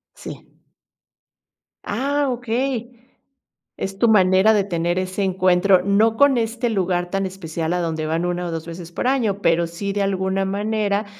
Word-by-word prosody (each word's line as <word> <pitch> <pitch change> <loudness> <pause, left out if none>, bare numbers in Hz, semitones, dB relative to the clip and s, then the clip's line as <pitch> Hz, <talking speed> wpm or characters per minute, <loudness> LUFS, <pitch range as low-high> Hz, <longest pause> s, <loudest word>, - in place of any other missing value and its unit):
Sí. - - -10 1.4
Ah, 280 +5 -1
okey, 245 0 -2 0.9
es 195 0 -5
tu 235 - +3
manera 190 +1 +5
de 205 -2 +2
tener 175 -1 -1
ese 185 +2 -2
encuentro, 185 0 +3
no 220 +3 +2
con 280 -3 +4
este 235 +1 -1
lugar 180 -4 -1
tan 195 +1 -1
especial 170 -3 -4
a 180 - 0
donde 160 -2 -2
van 165 +2 -1
1, 175 0 -2
o, - - -4
2 165 0 -5
veces 170 0 -8
por 250 - -2
año, 220 -7 0
pero 170 +1 +2
sí, 195 +4 -5
de 205 - -1
alguna 190 0 -1
manera 205 +1 -1
195 Hz, 160 wpm, -21 LUFS, 175-220 Hz, 1.4 s, manera